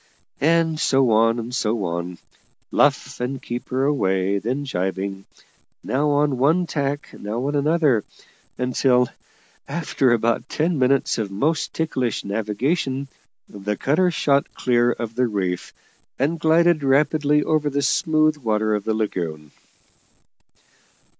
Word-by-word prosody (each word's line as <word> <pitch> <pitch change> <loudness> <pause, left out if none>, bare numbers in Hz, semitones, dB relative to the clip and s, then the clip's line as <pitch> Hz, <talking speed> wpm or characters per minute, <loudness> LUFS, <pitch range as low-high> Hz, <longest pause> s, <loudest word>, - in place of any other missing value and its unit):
And 160 +1 +2
so 135 -5 +3
on, 115 +2 +3
and 120 +1 -5
so 110 -2 0
on. 85 0 -4 0.5
Luff, - - +1
and 130 +2 -3
keep 120 0 -6
her 130 +1 0
away; 100 -8 +1
then 130 +7 -3
jibing; 95 -3 -3 0.6
now 145 +3 0
on 145 -2 +1
one 160 +7 +3
tack, 145 -2 -3
now 110 +5 -4
on 145 - -1
another; 145 -6 +2 0.5
until, 125 0 +2 0.6
after 140 -4 0
about 115 +2 +1
ten 160 0 0
minutes 130 -1 +2
of 105 -3 -2
most 145 +11 -1
ticklish 130 -8 -1
navigation, 130 - -1 0.4
the 105 0 -4
cutter 180 +7 +2
shot 140 -4 +1
clear 120 -1 +2
of 115 -2 -5
the 125 +1 +1
reef, 95 -5 -3 0.5
and 155 +5 0
glided 165 +1 +3
rapidly 150 +2 +2
over 155 -2 +1
the 140 0 -1
smooth 155 +1 +2
water 110 -4 0
of 105 -1 -2
the 110 - 0
lagoon. 80 -8 -3
130 Hz, 130 wpm, -22 LUFS, 110-150 Hz, 0.6 s, so